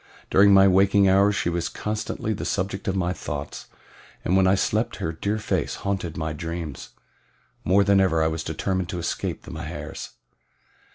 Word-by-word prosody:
During 100 +1 +6
my 95 0 +7
waking 95 +1 +4
hours 100 +2 +4
she - - -1
was 85 -1 -1
constantly 110 +1 -3
the - - -5
subject 95 0 -2
of 95 - 0
my 90 -1 0
thoughts, 75 -4 -6 0.6
and 90 - +2
when 95 -1 +4
I 95 - +4
slept - - 0
her 80 - -3
dear 100 +6 -2
face 105 - -2
haunted 95 -5 -2
my 80 0 -2
dreams. 80 -2 -6 0.7
More 100 +3 +4
than 100 -1 +4
ever 80 -4 +2
was 80 0 -3
I - - -8
determined 95 +3 -2
to 90 - -4
escape 85 - -3
the - - -10
Mahars. - - -6
95 Hz, 175 wpm, -24 LUFS, 80-100 Hz, 0.7 s, my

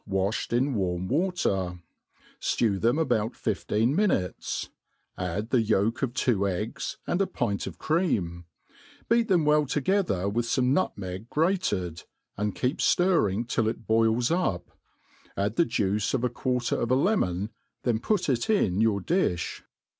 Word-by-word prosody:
waflied 95 +2 -1
in 130 +4 +1
Warm 90 -4 -1
water; 125 - 0 0.6
ftew 100 -5 +1
them 120 +5 +3
about 120 -7 +1
Afteen 115 +5 0
minutes; 155 - -1 0.4
add 95 +5 -3
the 125 - +4
yolk 110 +1 +1
of 130 -2 -1
two 100 -8 +1
eggs, 105 +9 -3
and 175 - 0
a 195 - +2
pint 110 - -2
of - - -7
cream; 100 - 0 0.6
beat 230 -1 +3
them 175 -7 +3
well 150 -1 +3
toge 190 +8 +1
ther 95 +1 -1
with 115 +4 -1
fome 125 +1 +2
nptmeg 100 - -2
grated, 150 - 0 0.3
and 105 0 -2
keep 130 +4 -1
fUrring 120 - +2
till 115 -2 0
it 115 0 -3
boils 115 +3 +2
up; 170 - -1 0.7
add 100 +2 0
the 170 - +4
juice 105 0 0
of 125 - -1
a 125 - +2
quarter 125 0 -1
of 115 - -1
a 130 - +4
lemon, 110 - +1 0.3
then 115 -3 +1
pUI 210 - 0
it 125 - 0
in 105 - +2
your 110 -3 +2
ttlifh. 90 - 0
115 Hz, 155 wpm, -27 LUFS, 100-150 Hz, 0.7 s, the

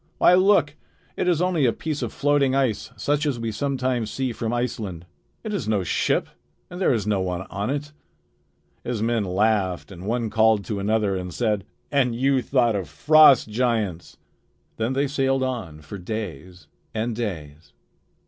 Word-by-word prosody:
Why, - - +5
look! 180 -6 +4 0.4
It - - -1
is 175 -1 +2
only 170 -7 +2
a - - +3
piece 155 +4 -4
of - - -3
floating 140 -2 +2
ice 130 -6 0
such 145 +1 0
as 130 -5 -1
we 115 -1 -2
sometimes 130 -1 -1
see 130 +3 -2
from 115 0 -3
Iceland. 110 -8 -3 0.4
It 215 -2 -4
is 200 - -3
no 105 -3 +1
ship, - - 0 0.4
and 180 +1 -7
there - - +3
is 110 -6 0
no 105 -2 +1
one 90 -1 -2
on 100 +3 -2
it." 145 +2 -3 0.9
His 115 -3 -2
men 115 -1 +1
laughed 95 -1 0
and 95 +1 -9
one 115 -1 -1
called 110 -2 +3
to 105 -3 -3
another 105 -1 +1
and 90 -1 -4
said: 105 -2 -1 0.3
"And 130 -5 +2
you 135 +2 +2
thought 120 -3 +2
of 95 -7 -3
frost 145 - +6
giants!" 110 -7 -1 0.6
Then 115 +3 -1
they 140 +2 +1
sailed 135 -1 0
on 110 -13 -4
for 95 +7 -9
days 90 -4 -6 0.3
and 110 +1 -1
days. 80 -9 -6
115 Hz, 170 wpm, -24 LUFS, 100-135 Hz, 0.9 s, frost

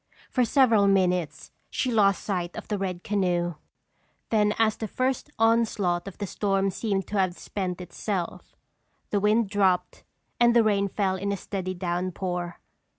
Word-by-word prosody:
For 250 - +2
several 230 -5 +4
minutes 180 -6 +1 0.2
she 255 - -1
lost 200 -4 +3
sight 180 -4 -2
of - - -8
the 210 -2 -1
red 185 -2 -3
canoe. 180 -4 0 0.8
Then 210 -2 +3
as 220 -1 +3
the 220 - -4
first 255 +6 -1
onslaught 220 -6 +2
of 195 - -8
the 205 - -3
storm 195 0 0
seemed 195 -1 -1
to 205 - 0
have 185 -2 +1
spent 185 -3 -4
itself, 180 +1 -4 0.6
the 205 - +2
wind 210 +2 +3
dropped 190 -3 +1 0.4
and 240 0 +5
the 235 - +6
rain 200 -2 +2
fell 190 -1 0
in 200 +2 -2
a 200 - -1
steady 185 -1 -4
downpour. 175 0 -3
195 Hz, 155 wpm, -26 LUFS, 180-215 Hz, 0.8 s, the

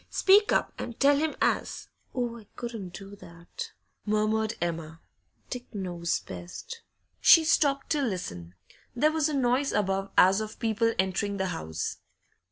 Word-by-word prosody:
Speak 405 +2 +5
up - - +1
and 235 - -6
tell 285 +1 +5
him 310 +1 0
as - - -1
' - - -42
'Oh, 240 -2 -2
I 210 - -17
couldn't 225 -7 -6
do 195 +1 -9
that!' 170 -2 -9 0.3
murmured 215 +1 0
Emma. 165 -2 -3 0.5
'Dick 245 -2 -7
knows 175 -3 -2
best.' 460 - -8 0.4
She 330 - +8
stopped 285 -3 +2
to 300 - +2
listen; 95 - -4 0.4
there 300 +5 +3
was 315 -1 +1
a - - -3
noise 260 +1 +2
above 195 -1 0
as 190 +3 +6
of 215 0 -6
people 230 0 +1
entering 190 +2 0
the 190 -1 -1
house. 80 - -4
215 Hz, 155 wpm, -28 LUFS, 185-265 Hz, 0.5 s, She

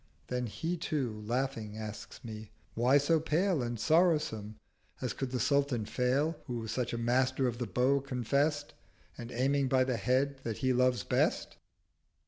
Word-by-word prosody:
Then 125 -1 -1
He 165 +10 -3
too 135 -10 -2
laughing 120 -4 -2
asks 110 +3 -8
me 110 -2 -7 0.2
"Why 125 +4 +4
so 155 +3 +3
pale 165 +1 +1
And 120 -1 -3
sorrow 165 - +4
some? 110 -7 -6 0.4
as - - -2
could 135 - -3
the 125 0 -2
Sultan 140 -3 +1
fail, 135 +8 0
Who 120 -3 -3
such 120 +2 -2
a 120 - -2
master 125 +3 +1
of 120 -1 -3
the 120 - -2
Bow 130 +3 +2
confest, 140 +3 0 0.4
And 120 0 -8
aiming 135 +3 +1
by 130 0 +3
the 130 -2 -1
Head 130 +3 +1
that 115 -4 -4
he 130 -1 +1
loves 125 0 +2
best."' - - 0
130 Hz, 165 wpm, -31 LUFS, 120-140 Hz, 0.4 s, Why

